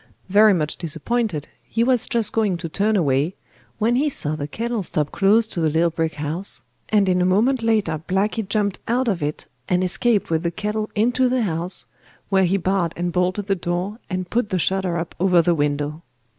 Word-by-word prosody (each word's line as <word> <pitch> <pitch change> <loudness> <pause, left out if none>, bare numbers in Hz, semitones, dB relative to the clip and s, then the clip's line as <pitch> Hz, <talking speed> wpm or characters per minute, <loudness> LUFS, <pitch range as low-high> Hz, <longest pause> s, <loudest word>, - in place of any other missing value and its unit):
Very 210 +2 +6
much 155 -3 -1
disappointed, 170 +1 -2
he 230 - -1
was 250 -2 +2
just 225 -3 0
going 210 -5 +1
to 170 0 -5
turn 205 +6 0
away, 150 -1 +1 0.4
when 230 +3 +2
he 295 +3 +2
saw 155 - -1
the 145 -1 -4
kettle 230 +5 -3
stop 150 -5 -1
close 210 +4 +3
to 185 -6 -5
the 160 - +2
little 165 +2 +2
brick 160 -1 -2
house, 150 -3 -2 0.3
and 205 -2 +3
in 180 -1 +2
a - - +3
moment 225 +8 +2
later 210 -9 +1
Blacky 200 +2 0
jumped 200 -2 0
out 250 +2 +1
of 195 -6 0
it 150 +1 -3 0.2
and 180 0 +2
escaped 205 +2 +1
with 160 -1 +1
the 170 - 0
kettle 210 +4 -3
into 245 +4 +2
the 250 -1 +1
house, 175 -1 -2 0.4
when 190 -1 +3
he 195 +3 +2
barred 185 -2 0
and 175 0 -1
bolted 185 +3 0
the 200 - +1
door, 180 +4 -3
and 185 -2 -4
put 230 -2 0
the 185 - 0
shutter 185 0 +1
up 165 0 -4
over 180 -1 +4
the 170 +1 +3
window. 145 0 -1
185 Hz, 200 wpm, -22 LUFS, 165-215 Hz, 0.4 s, Very